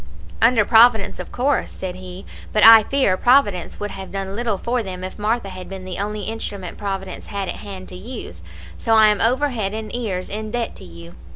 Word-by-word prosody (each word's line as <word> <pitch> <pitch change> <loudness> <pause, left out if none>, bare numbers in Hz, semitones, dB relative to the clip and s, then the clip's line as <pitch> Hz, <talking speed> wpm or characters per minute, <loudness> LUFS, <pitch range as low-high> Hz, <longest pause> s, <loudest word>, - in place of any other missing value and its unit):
"'Under 230 -2 +5
Providence, 225 -2 +5
of - - -7
course,' 270 +3 0
said 185 -1 -6
he; 185 0 -10 0.3
'but 215 - +4
I 225 0 +11
fear 260 -4 +1
Providence 225 -9 +2
would 205 -1 -4
have 190 -1 -8
done 195 0 -4
little 225 -3 -1
for 240 +4 -1
them 185 -3 -7
if 185 +3 -7
Martha 215 0 -1
had 185 -1 -9
been 190 -1 -8
the 185 -1 -6
only 210 +1 -3
instrument 200 -4 -6
Providence 195 -2 -5
had 200 -2 -4
at - - -4
hand 190 -2 -9
to - - -9
use, 185 - -8 0.4
so 225 - +1
I 215 -1 +7
am 210 - +1
over 260 +6 +2
head 215 -5 -3
and 220 +1 -5
ears 195 -7 -3
in 215 +1 -5
debt 235 +1 -3
to - - -12
you.' 85 0 -12
205 Hz, 210 wpm, -21 LUFS, 185-225 Hz, 0.4 s, I